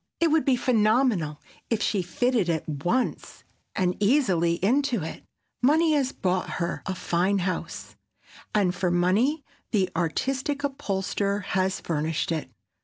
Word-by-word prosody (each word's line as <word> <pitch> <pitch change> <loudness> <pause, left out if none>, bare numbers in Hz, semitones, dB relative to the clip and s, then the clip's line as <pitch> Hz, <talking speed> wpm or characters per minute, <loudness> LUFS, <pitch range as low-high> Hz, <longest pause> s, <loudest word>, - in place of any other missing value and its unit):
It 335 - +3
would 315 0 +3
be 270 -3 +4
phenomenal 215 - +2 0.3
if 230 - +1
she 205 -3 +1
fitted 220 +2 0
at 160 -2 -1
once 175 - -2 0.3
and 180 -3 +1
easily 195 - +3
into 235 - +1
it. 160 - -7 0.4
Money 310 +5 +4
has 275 -3 +1
bought 185 0 -1
her 170 -1 -2
fine 185 +3 +1
house, 185 0 -4 0.6
and 190 -4 +3
for 180 0 -1
money 200 - +2 0.3
the 195 -4 +1
artistic 265 - -1
upholsterer 200 -6 -1
has 190 0 -1
furnished 160 0 -2
it. 155 -5 -2
200 Hz, 130 wpm, -26 LUFS, 175-255 Hz, 0.6 s, be